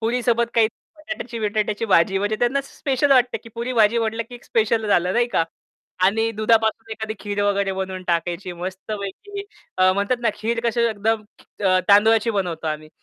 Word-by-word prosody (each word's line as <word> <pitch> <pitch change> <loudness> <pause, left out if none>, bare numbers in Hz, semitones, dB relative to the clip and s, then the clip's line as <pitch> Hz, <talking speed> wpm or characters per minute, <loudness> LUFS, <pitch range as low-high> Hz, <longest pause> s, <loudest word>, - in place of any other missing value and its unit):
पुरीसोबत 235 0 +1
काही 230 -1 +5 0.3
बटाट्याची 305 -7 -6
विटाट्याची 215 0 -1
भाजी 190 -1 +3
म्हणजे 205 +2 -1
त्यांना 245 +4 +2
स्पेशल 275 0 -1
वाटते, 250 -1 +3
की 230 - -14
पुरी-भाजी 235 -2 +2
वाटलं 225 0 -1
की 245 - -10
एक 240 - -13
स्पेशल 220 0 +1
झालं 180 -2 +2
नाही 240 +1 +2
का? 165 - +1 0.6
आणि 225 +4 +2
दुधापासून 220 +1 +1
एखादी 220 0 -5
खीर 205 -1 -2
वगैरे 200 -1 +1
बनवून 190 -1 -4
टाकायची 175 +2 -1
मस्तपैकी 200 - -6 0.4
अ, 185 0 +5
म्हणतात 200 +5 0
ना, 235 - +3
खीर 230 +1 -2
कसं 235 0 +1
एकदम 220 +1 0 0.4
अ, 185 -1 +4
तांदुळाची 220 +3 +5
बनवतो 180 -6 -2
आम्ही. 155 0 -4
220 Hz, 165 wpm, -22 LUFS, 195-235 Hz, 0.6 s, काही